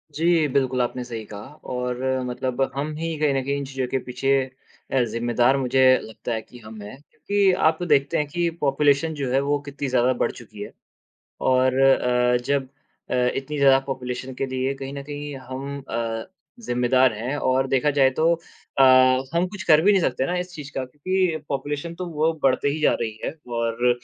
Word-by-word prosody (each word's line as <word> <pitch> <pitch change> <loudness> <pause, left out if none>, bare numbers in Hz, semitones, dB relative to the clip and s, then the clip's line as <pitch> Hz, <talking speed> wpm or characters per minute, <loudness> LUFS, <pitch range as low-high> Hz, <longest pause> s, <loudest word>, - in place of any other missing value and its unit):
जी, 165 -1 +3
बिल्कुल 130 -2 +1
आपने 125 +1 -2
सही 115 -3 -6
कहा 105 0 -9 0.3
और 125 0 -2 0.3
मतलब 125 +1 -3
हम 150 +2 -2
ही 165 0 -3
कहीं 150 -2 +2
न 135 - 0
कहीं 140 +1 -1
इन 140 - -4
चीज़ों 130 -1 -3
के 135 - -1
पीछे 130 +2 -2 0.6
अ, 130 - +3
ज़िम्मेदार 120 +3 +1
मुझे 130 0 +1 0.2
लगता 110 +2 -6
है 110 - -2
कि 120 +2 -15
हम 110 -1 -11
हैं, 105 +6 -9
क्योंकि 200 -1 +1 0.2
आप 160 +2 0
देखते 145 -1 +2
हैं 150 - 0
कि 170 +3 -1
पॉपुलेशन 145 +2 +2
जो 140 -4 -3
है 135 - +3
वो 145 +1 0
कितनी 145 0 -5
ज़्यादा 130 0 +2
बढ़ - - +2
चुकी 110 -3 -12
है। - - -9 0.7
और 130 0 +3
अ, 125 -2 +3
जब 140 -2 0 0.5
अ, - - +1 0.2
इतनी 145 +2 -4
ज़्यादा 135 -1 +5
पॉपुलेशन 130 0 -5
के 135 - -2
लिए 130 +1 -2
कहीं 135 0 -7
न 140 -1 -6
कहीं 145 0 -6
हम 140 +2 -5
अ, 115 -1 -3 0.3
ज़िम्मेदार 125 - +2
हैं 120 +7 -3
और 130 0 +1
देखा 135 +3 +2
जाए 135 -2 +4
तो 165 +1 +4
अ, 150 -4 -3 0.5
हम 175 +2 +2
कुछ 190 -2 -8
कर 155 -2 +5
भी 205 +4 +5
नहीं 195 -3 +3
सकते 130 -1 0
ना 180 - -1
इस 180 0 -6
चीज़ 145 -2 -8
का 130 -1 -2
क्योंकि 170 +5 -1
पॉपुलेशन 145 +4 -3
तो 180 +1 -5
वो 160 +1 +1
बढ़ते 135 +1 +2
ही 155 +2 -2
जा - - +4
रही 110 -1 -4
है। - - -2 0.2
और 115 +1 0
135 Hz, 195 wpm, -23 LUFS, 125-150 Hz, 0.7 s, ज़्यादा